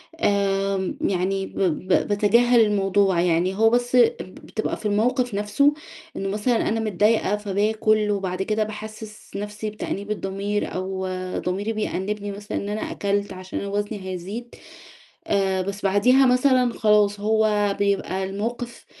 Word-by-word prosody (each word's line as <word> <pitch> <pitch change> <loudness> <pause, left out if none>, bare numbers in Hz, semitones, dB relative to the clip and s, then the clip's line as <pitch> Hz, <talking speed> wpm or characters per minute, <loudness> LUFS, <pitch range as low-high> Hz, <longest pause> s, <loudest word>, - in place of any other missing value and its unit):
آآ 195 - 0
يعني 195 +1 0
ب - - -9
ب 185 0 0 0.2
باتجاهل 235 +4 +4
الموضوع، 195 -3 +2
يعني 180 +2 +1
هو 225 +2 +4
بس 245 +1 +1 0.2
بتبقى 215 +3 -5
في - - -12
الموقف 245 +4 +1
نفسه 210 +9 +2 0.4
إنه 195 0 -3
مثلًا 220 +4 0
أنا 225 +1 0
متضايقة 215 0 +2
فباكل 210 +1 +1
وبعد 190 -2 -2
كده 215 +1 0
باحسس 215 0 -9
نفسي 210 +1 -4
بتأنيب 210 -1 -5
الضمير، 200 0 -2
أو 190 0 -3 0.3
ضميري 200 +5 -2
بيأنبني 205 -1 -3
مثلًا 205 +1 -5
إن 200 - -4
أنا 210 +1 -3
أكلت 200 0 -1
عشان 185 0 -6
أنا 200 - -5
وزني 205 +1 -2
هيزيد، 200 +7 -6 0.7
آآ 195 -2 +1
بس 200 +2 -5
بعديها 250 +8 +4
مثلًا 250 -1 +3
خلاص 210 -1 +3
هو 210 -1 +2
بيبقى 200 -1 0
الموقف 230 +5 -4
205 Hz, 135 wpm, -23 LUFS, 195-220 Hz, 0.7 s, باتجاهل